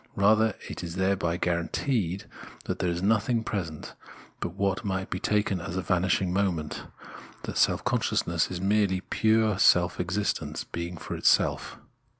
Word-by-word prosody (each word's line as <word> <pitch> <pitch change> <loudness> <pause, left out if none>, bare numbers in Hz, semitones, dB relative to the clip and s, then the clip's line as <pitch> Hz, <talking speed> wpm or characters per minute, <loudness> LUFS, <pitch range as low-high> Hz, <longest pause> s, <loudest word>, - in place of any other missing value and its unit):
Rather 110 +1 +4
it - - -6
is 85 0 -5
thereby 95 -3 +1
guaranteed 90 +3 -1 0.4
that - - -4
there 90 - +1
is 85 +1 -2
nothing 110 +2 +2
present 85 -9 -4 0.5
but 85 - -4
what 100 +1 0
might 95 -2 -3
be 90 - -2
taken 105 -3 0
as 85 +2 -5
a 95 - -1
vanishiing 90 +1 +1
moment 90 -6 -1 0.3
— - - -18
that - - -5
self - - +3
consciousness 85 -1 +1
is 90 - -4
merely 100 -1 +2
pure 110 +1 +2
se^f 90 -2 +4
existence, 95 +4 -2
being 85 +1 -5
for - - -6
self. - - +2
95 Hz, 155 wpm, -27 LUFS, 85-105 Hz, 0.5 s, Rather